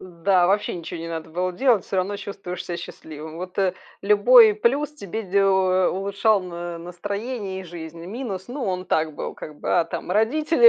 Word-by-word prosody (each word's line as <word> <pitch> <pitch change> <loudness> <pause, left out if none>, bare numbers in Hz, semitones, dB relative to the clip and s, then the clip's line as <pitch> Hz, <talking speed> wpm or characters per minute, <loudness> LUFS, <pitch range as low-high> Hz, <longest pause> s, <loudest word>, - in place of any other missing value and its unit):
Да, 180 0 +2
вообще 205 +1 +1
ничего 170 -1 -6
не 165 - -5
надо 160 -1 -5
было 180 +2 -1
делать, 235 -1 +3
всё 195 - -3
равно 195 +2 0
чувствуешь 195 -3 -6
себя 175 - -3
счастливым. 160 -2 -9
Вот, 180 +2 -7
э, 190 -2 +3 0.3
любой 210 +2 +7
плюс 275 +8 +1
тебе 220 - -5
делал, 190 -1 +3
э, 185 -1 +4
улучшал 200 +2 +1
н 175 -1 -6
настроение 200 +2 -4
и - - -9
жизнь. 165 -1 -8
Минус, 200 -1 -5
ну, 265 +2 -5
он 185 -1 -2
так 155 -3 +1
был, - - -4
как 150 -1 -9
бы, - - +1
а - - +1
там - - -5
родители 305 - +5
190 Hz, 190 wpm, -24 LUFS, 175-210 Hz, 0.3 s, любой